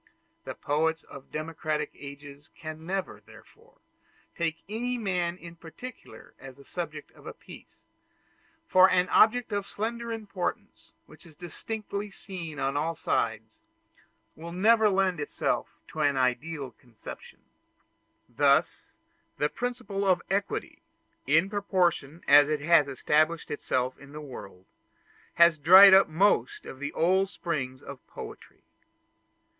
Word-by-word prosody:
The - - -6
poets 160 +2 -1
of 135 0 -13
democratic 155 0 -3
ages 140 +1 -11
can 160 0 -9
never, 175 - -3
therefore, - - -19 0.6
take 165 -1 -2
any 245 +4 -3
man 180 -5 -1
in 170 -2 -11
particular 170 +10 -12
as 135 -1 -11
the 140 - -16
subject 155 -4 -6
of - - -16
a - - -8
piece; - - -15 0.9
for 185 +1 +6
an 180 0 +2
object 230 +3 +4
of 200 -1 -2
slender 235 +2 -4
importance, 205 -5 -5
which - - -17
is 160 - -17
distinctly 200 +4 -6
seen 180 -6 -8
on 135 0 -1
all 165 +3 -1
sides, 110 -7 -2 0.8
will 165 +2 -9
never 215 +4 +4
lend 190 -3 +1
itself 145 - -2 0.2
to 155 - -8
an 145 -2 +2
ideal 135 +2 -1
conception. 120 0 -13 0.9
Thus - - +2 0.5
the 150 - +1
principle 245 -4 -4
of 185 -3 +2
equality; 200 +1 -2 0.5
in 160 +6 +4
proportion 180 -6 -1
as 145 +1 +7
it 150 -1 -1
has 155 -1 +4
established 155 +4 0
itself 130 -3 -2
in 140 0 -14
the 150 - -7
world, 100 -10 -10 0.7
has 170 -2 +5
dried 190 +6 +9
up 195 +1 +7
most 205 - +1
of 130 - -9
the 145 +1 -4
old 190 +3 +2
springs 130 -8 -4
of 140 -1 -9
poetry. - - -11
165 Hz, 130 wpm, -28 LUFS, 145-195 Hz, 0.9 s, dried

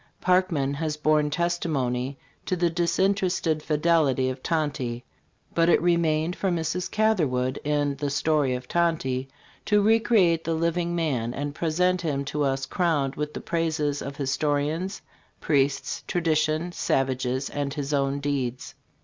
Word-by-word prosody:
Parkman 180 -7 +2
has 150 +1 -2
borne 150 -1 +2
testimony 145 -6 -1 0.3
to 185 - +1
the 175 -1 +1
disinterested 175 -1 +1
fidelity 150 -4 +2
of 130 0 -8
Tonty; 135 -7 -2 0.5
but 165 0 +3
it - - +5
remained 170 -1 +1
for 195 - -1
Mrs. 175 +1 -1
Catherwood 150 -13 +1
in 145 -1 0
"The 145 0 -2
Story 145 -2 +1
of 125 0 -7
Tonty" 155 -7 0 0.4
to 210 -1 +3
recreate 205 -6 +3
the 165 - -1
living 170 +1 0
man 130 -8 -1
and 145 +1 -3
present 180 +3 +1
him 140 -4 -2
to 150 +2 -3
us 135 -1 0
crowned 150 -6 0
with 150 0 -4
the - - -4
praises 155 -4 -1
of 140 0 -6
"histo 145 +2 0
rians, 160 +7 -2 0.4
priests, 140 -2 0
tradition, 160 0 0
savages 130 -3 0
and 145 -1 -2
his 145 0 -3
own 140 0 +1
deeds." 135 -3 -3
155 Hz, 140 wpm, -25 LUFS, 140-170 Hz, 0.5 s, it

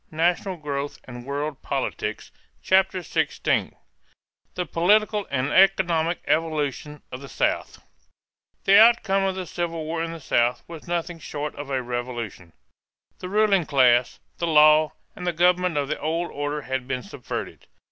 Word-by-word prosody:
NATIONAL 175 +4 0
GROWTH 145 -2 -4
AND 120 0 -10
WORLD 145 0 -3
POLITICS - - -3 0.3
CHAPTER 190 0 +2
XVI 170 - -1 0.8
THE 180 - -2
POLITICAL 210 +5 +2
AND 135 +1 -1
ECONOMIC 175 -3 +3
EVOLUTION 150 -2 -1
OF 125 - -7
THE 140 - -10
SOUTH - - -2 0.8
The 200 +1 +6
outcome 195 -4 +4
of 190 -1 -1
the 185 -1 -4
Civil 165 -1 -4
War 165 +1 -3
in 165 - -4
the 165 - -7
South 120 -3 +1
was 165 -1 -10
nothing 175 0 -3
short 150 -1 -5
of 145 -1 -8
a 130 -2 -1
revolution. 120 -7 -5 0.7
The 180 - -6
ruling 200 -4 +2
class, 125 -3 +3 0.2
the 170 - -1
law, 155 0 +5 0.2
and 180 - -6
the 175 - +1
government 180 0 +2
of 140 -1 0
the 155 - -3
old 165 +3 -2
order 145 +1 -3
had 130 -1 -3
been 130 -2 -3
subverted. 100 - -7
160 Hz, 150 wpm, -24 LUFS, 140-180 Hz, 0.8 s, The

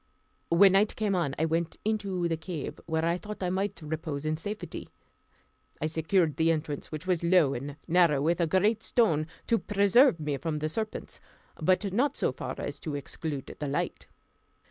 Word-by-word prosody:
When 185 +3 +7
night 200 +3 +3
came 210 -2 0
on 170 -7 0
I 160 - +2
went 165 +1 -1
into 200 -5 0
I 165 - 0
cave, 160 -2 -6
where 160 0 0
I 170 +2 +1
thought 210 -1 -7
I 180 - 0
might 195 +2 -1
repose 155 -1 -4
in 155 0 +1
safety. 205 +7 -6 0.9
I - - -1
secured 160 +1 +1
the 160 0 +3
entrance, 150 -2 -3
which 155 +2 -5
was 180 -3 0
low 170 -5 +4
and 140 +3 -5
narrow, 170 -4 +4
with 170 +5 +1
a 170 - +3
great 205 +6 +2
stone, 165 -12 +2 0.2
to 230 -2 +2
preserve 205 - +4
me 150 -2 -2
from 160 +1 -2
the 155 +1 -2
serpents; 215 +6 -4 0.4
but 185 +4 +2
not 270 +6 +2
so - - +1
far - - -5
as - - -5
to 155 -4 -4
exclude 145 0 -5
the 145 - -2
light. 140 - -2
170 Hz, 185 wpm, -29 LUFS, 155-195 Hz, 0.9 s, When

